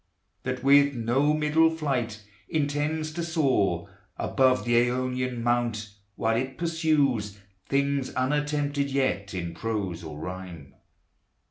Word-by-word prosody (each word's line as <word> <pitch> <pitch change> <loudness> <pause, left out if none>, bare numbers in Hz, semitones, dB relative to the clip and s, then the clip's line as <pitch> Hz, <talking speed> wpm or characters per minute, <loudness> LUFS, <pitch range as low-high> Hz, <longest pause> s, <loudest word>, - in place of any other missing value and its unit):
That 130 0 -4
with 140 0 +5
no 125 +6 +2
middle 155 +2 +4
flight 130 -9 -2 0.3
intends 155 +1 -1
to 170 - -3
soar 135 - +1 0.3
Above 130 -1 +2
the 120 - +1 0.2
Aonian 125 -1 -2
mount, 120 -3 0 0.2
while 115 0 +1
it 130 +2 -2
pursues 145 - +1 0.3
Things 140 -1 +1
unattempted 145 +1 0
yet 130 -8 -1
in 85 -2 -4
prose 95 -3 -3
or 75 -2 -7
rhyme. 90 -3 -7
130 Hz, 115 wpm, -27 LUFS, 110-145 Hz, 0.3 s, with